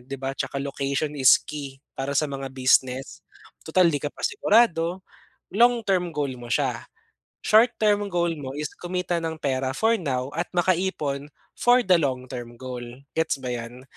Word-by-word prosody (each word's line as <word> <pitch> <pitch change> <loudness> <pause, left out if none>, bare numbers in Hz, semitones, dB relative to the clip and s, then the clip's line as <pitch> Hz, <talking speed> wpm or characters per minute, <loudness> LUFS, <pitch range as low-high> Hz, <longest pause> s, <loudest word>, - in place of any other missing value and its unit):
'di 135 +2 -6
ba, 135 0 -2
tsaka 140 0 -3
location 140 +2 -2
is 130 -3 +6
key 140 -3 -8 0.2
para 135 +1 -2
sa 155 - +3
mga 135 -1 -5
business? 130 0 +1 0.4
Tutal, 175 +2 +4
'di 145 0 -2
ka 145 - -2
pa - - -15
sigurado 190 - +2 0.5
long-term 210 -6 +3
goal 145 -3 -2
mo 120 - -9
siya. 130 -4 0 0.6
Short-term 215 -2 +4
goal 170 -1 +1
mo 130 -2 -5
is 150 0 -2
kumita 180 -1 -2
ng 160 0 -2
pera 130 -2 -1
for 225 +6 +3
now 130 -6 -2
at 170 +1 -1
makaipon 175 -6 0 0.3
for 245 +1 +5
the 185 -1 +5
long-term 130 -4 -3
goal. 125 -1 -6 0.3
Gets 160 -3 0
ba 125 - -2
'yan? 120 +1 -7
145 Hz, 160 wpm, -25 LUFS, 135-180 Hz, 0.6 s, is